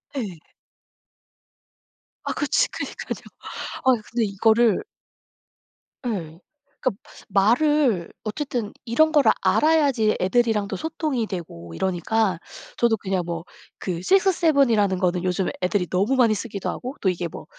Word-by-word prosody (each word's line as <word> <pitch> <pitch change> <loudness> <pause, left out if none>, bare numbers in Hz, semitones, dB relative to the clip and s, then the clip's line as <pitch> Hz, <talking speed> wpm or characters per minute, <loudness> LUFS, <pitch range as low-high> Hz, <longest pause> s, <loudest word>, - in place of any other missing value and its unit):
예. 200 - -4 1.8
아 - - -2
그치 - - +1
그니깐요. - - -5 0.6
아 260 - +6 0.2
근데 230 0 +1
이거를 220 - +3 1.2
예. 170 -9 -4 0.4
그러니까 255 - +2 0.4
말을 240 - +2
어쨌든 235 -1 -3
이런 315 +7 +3
거를 295 -3 +5
알아야지 285 -9 +3
애들이랑도 210 0 +1
소통이 300 - -2
되고 85 - -7
이러니까 190 - 0 0.4
저도 235 -2 +3
그냥 190 -3 -2
뭐 170 -1 -4 0.4
그 180 -3 -3
6-7 330 - +3
이라는 205 -4 +2
거는 180 -1 0
요즘 185 +1 0
애들이 180 0 0
너무 200 +10 +1
많이 240 -4 +4
쓰기도 205 -1 -4
하고 255 +3 -5
또 190 - +2
이게 175 -1 -2
뭐 160 - -10
215 Hz, 255 characters per minute, -23 LUFS, 185-255 Hz, 1.8 s, 아